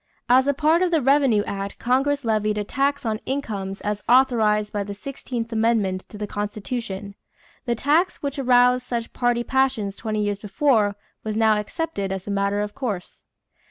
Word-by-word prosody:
As 255 +2 +5
a 285 - +3
part 315 +4 +3
of 365 - +3
the 330 -2 +3
revenue 270 -6 +3
act 200 0 -5
Congress 270 +3 +1
levied 215 -1 +1
a 210 - 0
tax 280 +5 -1
on 215 -1 -1
incomes 205 -8 -3
as 210 0 -2
authorized 225 -5 +3
by 205 -1 -1
the 200 0 -7
sixteenth 235 0 -5
amendment 220 -5 +1
to 210 - -10
the 210 - -3
Constitution. 205 -1 -4 0.5
The 240 -1 0
tax 300 +10 +1
which 280 0 -3
roused 250 -1 +4
such 235 -2 -4
party 240 -1 +1
passions 255 -7 0
twenty 215 -1 -2
years 205 -1 -1
before 210 -1 +2 0.3
was 215 -1 -3
now 220 -1 +4
accepted 210 -3 -3
as 190 -1 -4
a 205 - -4
matter 200 +1 0
of 210 0 -4
course. 215 -10 -5
225 Hz, 175 wpm, -23 LUFS, 205-265 Hz, 0.5 s, As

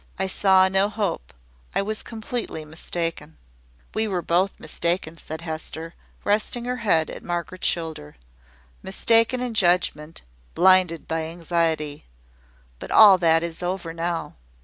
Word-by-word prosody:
I 190 - -1
saw 190 0 +4
no 190 +2 +2
hope; 205 - -3 0.4
I - - +2
was 215 +1 -4
completely 220 -7 -5
mistaken." 160 - -4 0.6
"We 220 0 0
were 180 -4 -2
both 185 +3 0
mistaken," 170 -1 -2
said 160 0 -8
Hester, 160 0 -6 0.3
resting 215 +3 0
her 250 0 -2
head 180 -9 +1
at - - -8
Margaret's 175 +1 -3
shoulder. 160 - -3 0.7
"Mistaken 230 +5 +2
in 250 -2 -2
judgment, 175 -5 +1 0.3
blinded 185 -2 +4
by 160 0 -2
anxiety. 165 -3 -2 0.7
But - - -8
all 200 -4 +8
that 165 -1 +3
is 170 0 -5
over 175 -2 -3
now. 170 0 -3
175 Hz, 130 wpm, -24 LUFS, 165-200 Hz, 0.7 s, all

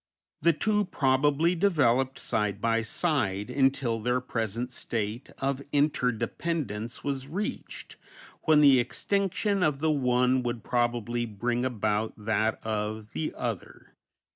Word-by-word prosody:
The 170 +2 +4
two 210 +5 +1
probably 145 +1 +2
developed 135 -8 +2
side 105 -1 -1
by 115 +1 +1
side 110 - -1
until 135 -4 +1
their 125 +3 +1
present 120 0 -3
state 115 0 -3
of 135 0 -1
inter 145 -3 +2
dependence 120 -3 -3
was 135 -2 -3
reached, 190 +8 -5 0.5
when 155 -2 +5
the 140 -3 +7
extinction 195 - 0
of 150 -5 +2
the 155 +2 +1
one 125 -2 +2
would 120 -2 -3
probably 120 -1 0
bring 120 +3 -2
about 110 -3 -1
that 110 +1 0
of 110 0 -3
the 80 - -3
other. - - -5
125 Hz, 125 wpm, -28 LUFS, 110-145 Hz, 0.5 s, the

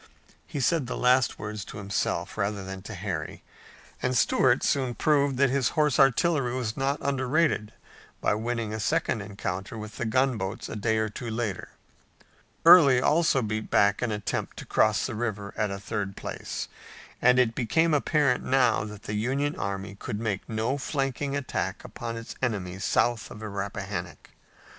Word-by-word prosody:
He 145 - -4
said 145 0 +1
the - - -4
last 125 0 +3
words 105 -1 -5
to - - -9
himself, 100 -1 -2
rather 100 -1 -1
than 95 0 -7
to 105 +2 -8
Harry, 90 -5 -5 0.6
and 125 -1 +1
Stuart 125 +2 +3
soon 130 -4 +1
proved 140 -3 +2
that 135 -1 +3
his 135 -3 +2
horse 150 -3 +3
artillery 135 -1 +3
was 120 -4 -2
not 135 +1 0
underrated 135 -4 +1 0.5
by - - +2
winning 115 0 -2
a 110 - -3
second 110 0 0
encounter 100 0 -5
with 105 -1 -8
the 120 - -2
gunboats 115 -4 0
a - - -6
day 110 +1 +1
or 110 0 +1
two 115 +3 -6
later. 110 -4 -3 1.0
Early 145 -7 +9
also 150 -1 +3
beat 110 0 -3
back 100 -1 +3
an 120 -2 0
attempt 105 -2 -3
to - - -7
cross - - +2
the - - -3
river 105 -3 -3
at 105 -1 0
a 100 - -4
third 100 0 -4
place, - - -5 0.5
and 125 +1 +5
it 125 -3 +3
became 160 +8 +2
apparent 145 -3 +2
now 130 -5 +3
that 105 0 -9
the 105 - -5
Union 135 +7 0
army 100 0 -4
could 100 +1 -5
make 105 -4 -3
no 115 +5 -1
flanking 140 0 -2
attack 140 -2 -3
upon 115 -1 -6
its 115 - -7
enemy 95 -7 -2
south 115 +2 +1
of - - -9
the 110 0 -6
Rappahannock. 100 0 -5
115 Hz, 170 wpm, -27 LUFS, 105-135 Hz, 1.0 s, Early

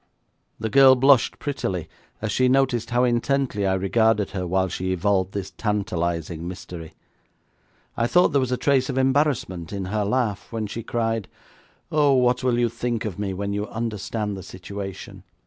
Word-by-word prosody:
The 110 0 -3
girl 135 -1 +8
blushed 135 -1 +4
prettily 95 - -3 0.4
as 110 - -1
she 130 +5 +3
noticed 130 -3 +2
how 120 0 +2
intently 120 -3 +1
I 95 - +2
regarded 105 +2 +2
her 90 -2 -3
while 95 +1 +1
she 95 +1 -3
evolved 95 0 +1
this 100 -2 -4
tantalising 85 -6 -2
mystery. 90 -3 -8 1.0
I 115 0 +1
thought 180 +7 +4
there 140 -3 +2
was 130 -1 -1
a 125 - +1
trace 135 -2 +2
of - - -2
embarrassment 130 - +1
in 100 -2 -3
her 105 -1 +1
laugh 105 -1 -1
when 115 -2 -2
she 110 +3 -5
cried: 115 -2 -2 0.6
'Oh, 145 -2 +4
what 125 -1 +2
will 125 -2 +2
you 120 0 +3
think 115 0 -3
of 100 -3 -5
me 100 -2 -2
when 100 +1 -3
you 105 +1 -2
understand 110 -2 -3
the 95 - -7
situation? 95 +1 -8
110 Hz, 170 wpm, -24 LUFS, 95-125 Hz, 1.0 s, girl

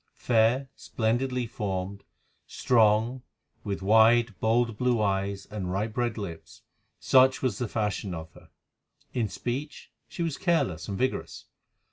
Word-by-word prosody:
Fair, 120 +3 +2
splendidly 125 +2 -1
formed, 100 -3 -4 0.4
strong, 115 +2 +2 0.4
with 100 -3 -4
wide, 110 +2 +5
bold, 115 0 +1
blue 125 +1 +1
eyes 100 -1 -1
and 95 -4 -4
ripe 105 +3 -2
red 120 -2 -1
lips, 90 -6 -8 0.4
such 130 0 +4
was 120 -7 0
the 120 - -1
fashion 105 -2 -2
of 80 0 -8
her. - - -17 0.6
In 115 -4 -1
speech 125 - -5 0.2
she 170 - -4
was 165 -4 -3
careless 95 - 0
and 100 - -4
vigorous. 130 +3 -3
110 Hz, 130 wpm, -27 LUFS, 100-125 Hz, 0.6 s, wide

